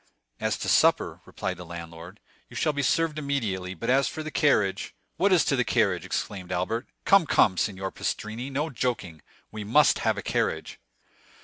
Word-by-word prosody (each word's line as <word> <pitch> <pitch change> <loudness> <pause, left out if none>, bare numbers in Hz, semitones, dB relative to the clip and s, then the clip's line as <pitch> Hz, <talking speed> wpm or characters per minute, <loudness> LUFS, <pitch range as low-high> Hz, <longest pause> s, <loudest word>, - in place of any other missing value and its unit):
"As - - 0
to - - -5
supper," - - +3
replied 90 - -4
the 90 - -8
landlord, 85 +2 -9 0.3
"you - - -13
shall 155 - +1
be 145 - -1
served 155 +2 +1
immediately; 105 -11 -2
but 115 - -6
as 135 +1 +3
for 155 - -5
the 155 - -6
carriage——" 105 -12 +1 0.2
"What 200 +1 +3
as 175 -5 +5
to 140 - +2
the 125 - +2
carriage?" 100 -8 +1
exclaimed 95 -3 -4
Albert. 90 +7 -2 0.2
"Come, 195 -5 +5
come, 95 -7 +4
Signor 95 0 -2
Pastrini, 115 +5 -4
no 145 +4 -2
joking; 110 - -3 0.3
we 110 -1 -6
must 135 +9 +4
have - - +1
a - - -4
carriage." - - -2
110 Hz, 180 wpm, -26 LUFS, 95-145 Hz, 0.3 s, as